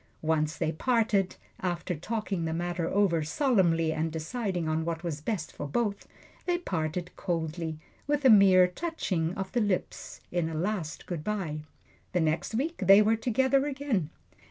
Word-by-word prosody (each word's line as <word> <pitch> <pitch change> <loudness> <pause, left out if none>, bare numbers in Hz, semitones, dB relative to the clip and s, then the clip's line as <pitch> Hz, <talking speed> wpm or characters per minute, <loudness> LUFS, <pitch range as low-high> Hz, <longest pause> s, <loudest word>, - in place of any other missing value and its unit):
Once 155 0 +1
they 160 -2 0
parted, 215 0 +1 0.2
after 180 0 -2
talking 195 +1 -3
the 160 - -1
matter 175 0 -2
over 190 -5 +2
solemnly 165 - +2
and 160 +1 -1
deciding 175 +1 -2
on 155 +1 0
what 165 0 -3
was 155 -4 -3
best 175 -1 -3
for 145 - -5
both 205 +5 -1 0.4
they 350 -1 +2
parted 175 - -3
coldly 165 -2 -3 0.3
with 290 -1 0
a - - +8
mere 190 -3 +7
touching 180 - -2
of 190 0 -4
the 240 - +1
lips 205 -4 -2
in 175 -2 0
a 160 - -5
last 175 -1 -3
good 170 -4 -4
by. 185 -7 -2 0.5
The 180 - +2
next 160 +7 0
week 315 +8 -1
they 195 +2 +9
were 220 +2 +3
together 265 +5 +2
again. 265 - -1
180 Hz, 160 wpm, -29 LUFS, 160-220 Hz, 0.5 s, they